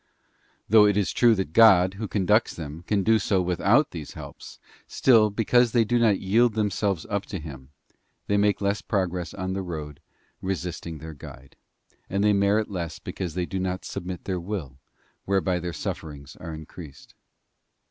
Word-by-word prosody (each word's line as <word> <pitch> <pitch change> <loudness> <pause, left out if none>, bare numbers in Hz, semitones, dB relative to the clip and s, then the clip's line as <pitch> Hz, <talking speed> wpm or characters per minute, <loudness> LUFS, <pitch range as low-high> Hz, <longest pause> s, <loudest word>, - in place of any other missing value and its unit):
Though 105 0 +6
it 105 -1 +1
is 100 - +1
true 120 -2 +4
that 95 -6 -3
God, 95 -4 +6
Who 105 +2 -5
conducts 105 +3 +1
them, 80 0 -7
can 100 -2 +1
do 110 +2 +4
so 100 -1 +1
without 90 - +2
these 80 -4 -8
helps, - - -10 0.3
still, 115 -5 +4
because 115 +3 +2
they 120 -2 +4
do 120 +3 +1
not 110 -4 +3
yield 110 +4 +2
them 105 -2 0
selves 95 -3 -1
up 100 0 -3
to 100 - -5
Him, 70 -5 -10 0.6
they 100 - 0
make 100 0 +2
less 100 +1 0
progress 90 -4 -2
on 95 0 -3
the 95 - -2
road, 75 -5 -6 0.4
resisting 90 -3 -4
their 80 +1 -9
Guide; 70 -1 -13 0.5
and 100 +1 0
they 105 0 +4
merit 100 +2 +2
less 85 -4 -4
because 90 -4 -6
they 90 -1 -1
do 95 +2 -4
not 95 0 -3
submit 90 0 -6
their 95 -2 -2
will, 85 -8 -6 0.5
whereby 95 -2 +1
their 90 0 -4
sufferings 70 -4 -6
are 85 - -8
increased. 80 -2 -11
95 Hz, 175 wpm, -25 LUFS, 85-105 Hz, 0.6 s, Though